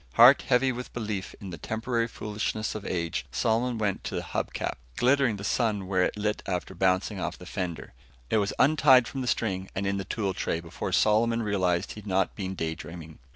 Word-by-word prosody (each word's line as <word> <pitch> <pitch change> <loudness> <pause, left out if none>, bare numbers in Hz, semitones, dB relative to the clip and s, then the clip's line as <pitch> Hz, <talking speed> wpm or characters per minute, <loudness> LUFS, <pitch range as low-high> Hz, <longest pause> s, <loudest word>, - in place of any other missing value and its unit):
Heart 125 +4 +8
heavy 130 +1 +3
with 125 0 -7
belief 105 -5 -4
in 95 -2 -7
the 85 - -7
temporary 115 +3 -1
foolishness 110 -1 -3
of 105 -1 -6
age, 80 -7 -2
Solomon 115 - +1
went 105 -3 -1
to - - -3
the - - -2
hub - - -3
cap, - - -3 0.2
glittering 130 -2 +3
the 100 - -8
sun 105 -2 0
where 95 -1 +1
it 90 - +1
lit 105 0 -1
after 90 0 -2
bouncing 95 +2 +1
off 85 -1 -3
the 90 - -11
fender. 90 -3 -4 0.4
It - - +4
was 100 -1 +1
untied 130 -3 +6
from 135 - -4
the 125 - -3
string, 95 -6 -1
and 95 - -1
in 100 0 0
the 95 - -2
tool 100 0 -2
tray, 80 - -1
before 85 0 -5
Solomon 115 +2 +3
realized 95 -3 0
he'd 105 -1 -9
not 95 0 +1
been 95 -2 -4
daydreaming. 80 -1 -6
105 Hz, 200 wpm, -28 LUFS, 95-115 Hz, 0.4 s, Heart